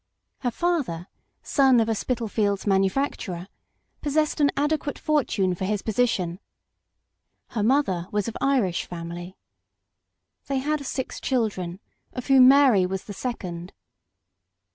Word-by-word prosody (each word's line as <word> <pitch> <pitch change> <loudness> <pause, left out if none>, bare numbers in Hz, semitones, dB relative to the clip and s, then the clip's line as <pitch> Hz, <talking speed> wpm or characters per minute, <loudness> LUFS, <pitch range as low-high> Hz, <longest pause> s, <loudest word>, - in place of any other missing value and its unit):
Her 245 - 0
father, 245 - -1 0.3
son 265 -4 +4
of 225 - +2
a 225 - +1
Spitalfields 215 -3 -1
manufacturer, 195 -2 0 0.5
possessed 305 +1 0
an 285 - +5
adequate 295 0 0
fortune 230 - +1
for 185 +2 -3
his 205 0 -1
position; 205 -6 0 1.1
her 225 - -2
mother 205 -7 +1
was 210 0 -1
of 230 - -5
Irish 245 -11 +1
family. 175 +1 -7 1.1
They 275 - 0
had 295 +2 -1
six 260 -1 -4
children, 195 -8 -1 0.3
of 250 - -5
whom 265 -2 +7
Mary 260 -9 +6
was 190 0 -4
the 205 - -8
second. 185 -7 -5
225 Hz, 120 wpm, -25 LUFS, 185-275 Hz, 1.1 s, whom